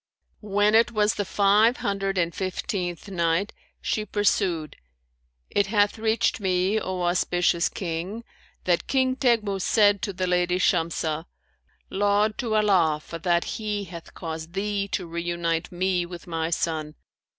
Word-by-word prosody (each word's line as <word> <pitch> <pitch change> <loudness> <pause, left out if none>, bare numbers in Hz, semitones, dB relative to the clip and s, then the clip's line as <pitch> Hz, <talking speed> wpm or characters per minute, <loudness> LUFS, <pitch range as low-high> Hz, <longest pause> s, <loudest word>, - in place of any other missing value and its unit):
When 205 0 +2
it 230 +1 +5
was 215 -1 +2
the 205 - -2
Five 205 +5 +4
Hundred 195 -1 -2
and 170 -1 +1
Fifteenth 185 -1 -3
Night, 175 +1 0 0.3
She 215 - 0
pursued, 195 -6 0 0.8
It 205 -1 +2
hath 205 +1 +2
reached 220 +1 +1
me, 190 +2 +1
O 185 -3 -3
auspicious 175 -1 +2
King, 185 +5 -4 0.4
that 175 -2 +1
"King 260 -1 +2
Teghmus 220 -7 +1
said 205 -1 +4
to 205 - -2
the 185 0 -2
lady 180 0 +1
Shamsah, 165 -3 0 0.7
'Laud 205 +2 +1
to 230 -4 -1
Allah 185 -8 +3
for 165 +2 -8
that 170 0 +2
He 210 -2 -3
hath 170 -3 -10
caused 160 0 -6
thee 200 0 -1
to 190 -2 -3
reunite 170 0 -2
me 180 -1 0
with 175 -1 -9
my 165 -1 -2
son! 155 -2 -2
190 Hz, 140 wpm, -25 LUFS, 170-205 Hz, 0.8 s, it